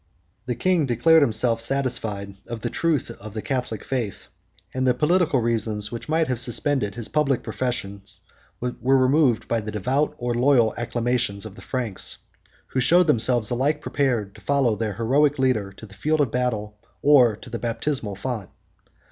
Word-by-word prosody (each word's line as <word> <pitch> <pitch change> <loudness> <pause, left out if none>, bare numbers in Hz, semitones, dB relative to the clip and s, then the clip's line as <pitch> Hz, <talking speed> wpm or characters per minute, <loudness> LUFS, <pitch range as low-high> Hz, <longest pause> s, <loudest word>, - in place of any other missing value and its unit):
The 125 - -1
king 165 +3 +1
declared 155 +7 +4
himself 115 -2 +2
satisfied 115 -6 -1
of 115 -1 -6
the - - -3
truth 155 -8 0
of 110 -1 -9
the 110 - -3
Catholic 125 -6 -3
faith; 120 -7 -4 0.4
and 130 0 0
the 125 - +3
political 155 -1 +2
reasons 110 -2 -1
which 120 +5 -7
might 160 0 +2
have 125 -3 -1
suspended 125 -2 +1
his 115 -2 -3
public 145 -4 0
profession, 100 -6 -3 0.6
were 125 +2 +1
removed 130 -3 +3
by 115 -1 0
the 105 - -6
devout 130 +8 -1
or 120 -1 -2
loyal 120 -2 +3
acclamations 120 -3 -1
of 110 - -8
the 110 - -13
Franks, 120 -7 0 0.5
who 130 - -1
showed 175 +7 +5
themselves 120 -5 +3
alike 140 +5 +1
prepared 120 -10 -1
to - - -16
follow 135 -6 +1
their 105 -2 -3
heroic 140 +7 +2
leader 125 -7 +1
to 110 - -12
the 100 - -15
field 155 +10 0
of 140 -6 +1
battle, 110 -4 -2 0.2
or 130 -7 +6
to 115 +3 -13
the 115 - -4
baptismal 115 -2 -2
font. 110 -3 -5
120 Hz, 170 wpm, -23 LUFS, 110-135 Hz, 0.6 s, or